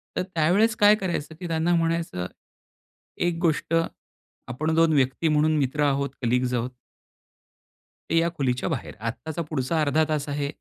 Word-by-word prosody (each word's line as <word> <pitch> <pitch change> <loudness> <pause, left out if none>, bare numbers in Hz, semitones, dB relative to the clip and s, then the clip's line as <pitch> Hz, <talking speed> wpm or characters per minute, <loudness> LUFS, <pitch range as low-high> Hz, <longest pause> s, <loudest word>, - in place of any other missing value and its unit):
तर - - +1
त्यावेळेस 190 +6 +2
काय 210 0 +6
करायचं 170 -6 -3
की 180 - -5
त्यांना 165 +1 +1
म्हणायचं. 165 - -1 0.9
एक 175 -1 0
गोष्ट 165 -1 0 0.8
आपण 155 +6 -1
2 165 -1 +4
व्यक्ती 135 +3 +1
म्हणून 155 0 +3
मित्र 145 +1 0
आहोत, 140 -1 +1
कलीग्स 125 +1 +1
आहोत. 120 0 -1 1.4
ते 165 - +2
या 165 +1 +3
खोलीच्या 125 0 0
बाहेर 145 -8 -4
आत्ताचा 150 +9 -4
पुढचा 155 +2 0
अर्धा 155 +1 +2
तास 150 -1 -1
आहे. 145 0 -1
155 Hz, 145 wpm, -25 LUFS, 135-165 Hz, 1.4 s, काय